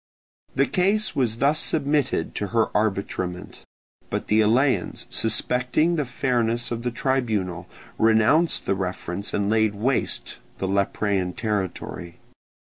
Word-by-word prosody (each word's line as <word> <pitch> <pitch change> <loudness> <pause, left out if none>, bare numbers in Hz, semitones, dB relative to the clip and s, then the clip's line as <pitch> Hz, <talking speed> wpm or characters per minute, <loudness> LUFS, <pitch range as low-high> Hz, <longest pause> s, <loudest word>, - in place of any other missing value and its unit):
The 135 +1 +3
case 200 +6 +1
was 115 -4 0
thus 145 +5 +2
submitted 145 - 0
to 105 - -3
her 115 +1 0
arbitrament; 95 -3 -2 0.5
but - - -3
the 110 +1 +4
Eleans, 125 +6 +1
suspecting 125 +8 +2
the 150 -3 0
fairness 120 -2 0
of 120 0 -2
the 120 - -1
tribunal, 110 - -1 0.3
renounced 110 +10 +3
the - - +1
reference 95 0 -3
and 100 -1 0
laid 110 -1 +2
waste 125 +5 -1 0.2
the 95 - -2
Leprean 100 -1 0
territory. 95 -5 -4
110 Hz, 125 wpm, -24 LUFS, 100-130 Hz, 0.5 s, the